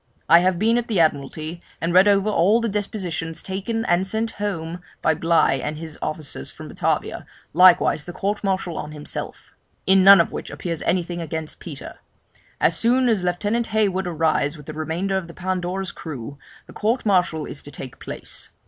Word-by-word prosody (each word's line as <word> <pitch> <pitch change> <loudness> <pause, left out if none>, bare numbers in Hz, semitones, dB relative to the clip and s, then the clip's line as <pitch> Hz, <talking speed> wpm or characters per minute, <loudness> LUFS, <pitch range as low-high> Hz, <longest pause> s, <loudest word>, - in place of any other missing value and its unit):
I 170 - +8
have 180 0 +2
been 225 +5 +3
at 240 - -5
the 210 -6 0
Admiralty, 155 +2 0 0.2
and 170 +1 -1
read 185 +3 +7
over 200 0 +4
all 210 +2 +4
the 230 - -1
depositions 180 -6 -3
taken 210 +4 -3
and 175 +2 +2
sent 225 +3 -1
home 175 -4 -3 0.2
by 160 - +2
Bligh 165 -5 +2
and 150 0 -3
his 160 -1 -8
officers 145 - -3
from - - -10
Batavia, - - -2 0.3
likewise 180 -4 +5
the 175 - -6
court 200 +4 -2
martial 190 -4 -1
on 150 - -6
himself; 150 -1 -7 0.3
in 190 0 +5
none 195 +1 +10
of - - +2
which - - -6
appears 170 -3 -4
anything 175 -1 -1
against 160 -1 -5
Peter. 150 -6 -9 0.6
As 165 - +3
soon 245 +5 +3
as 210 -5 +1
Lieutenant 205 +6 0
Hayward 200 -4 +1
arrives 160 -2 +1
with 150 - -12
the 155 - -7
remainder 165 +5 -2
of 185 -3 -4
the 170 - -12
Pandora's 185 0 -2
crew, 140 -3 -8 0.3
the - - -14
court 225 +4 0
martial 180 -6 +2
is 145 - -8
to - - -11
take 135 -2 -9
place. - - -7
180 Hz, 185 wpm, -22 LUFS, 160-200 Hz, 0.6 s, none